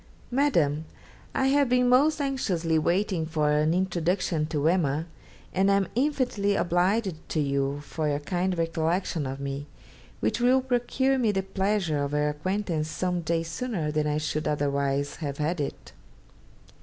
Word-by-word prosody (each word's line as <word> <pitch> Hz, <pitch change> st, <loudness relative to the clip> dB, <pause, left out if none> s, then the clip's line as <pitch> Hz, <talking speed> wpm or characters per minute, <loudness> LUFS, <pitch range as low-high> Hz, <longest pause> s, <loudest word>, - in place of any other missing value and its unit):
'MADAM, 170 Hz, -, +2 dB, 0.5 s
I 265 Hz, -, +2 dB
have 280 Hz, -1 st, +3 dB
been 250 Hz, 0 st, +3 dB
most 290 Hz, +5 st, +4 dB
anxiously 185 Hz, -, 0 dB
waiting 175 Hz, 0 st, 0 dB
for 155 Hz, -2 st, +1 dB
an 150 Hz, +1 st, +2 dB
introduction 175 Hz, -2 st, 0 dB
to 155 Hz, -1 st, 0 dB
"Emma," 160 Hz, -3 st, +1 dB, 0.5 s
and 190 Hz, +1 st, +3 dB
am 200 Hz, -1 st, +2 dB
infinitely 250 Hz, -7 st, +1 dB
obliged 185 Hz, +4 st, +1 dB, 0.2 s
to 155 Hz, -, -1 dB
you 140 Hz, 0 st, 0 dB
for 150 Hz, +1 st, -3 dB
your 145 Hz, -, +1 dB
kind 180 Hz, +4 st, -1 dB
recollection 165 Hz, -1 st, -1 dB
of 135 Hz, +1 st, -5 dB
me, 140 Hz, +1 st, -4 dB, 0.5 s
which -, -, 0 dB
will 255 Hz, +2 st, +4 dB
procure 260 Hz, +1 st, +1 dB
me 225 Hz, -4 st, +3 dB
the 190 Hz, -1 st, -1 dB
pleasure 190 Hz, -6 st, 0 dB
of 140 Hz, 0 st, -3 dB
her 150 Hz, 0 st, +2 dB
acquaintance 165 Hz, 0 st, -2 dB
some 180 Hz, +2 st, -1 dB
days 165 Hz, 0 st, -1 dB
sooner 170 Hz, -5 st, -2 dB
than 150 Hz, 0 st, 0 dB
I 150 Hz, 0 st, 0 dB
should 155 Hz, 0 st, -2 dB
otherwise 140 Hz, -1 st, 0 dB
have 140 Hz, -3 st, -4 dB
had 155 Hz, +2 st, -1 dB
it. 140 Hz, -, -5 dB
170 Hz, 155 wpm, -27 LUFS, 150-205 Hz, 0.5 s, most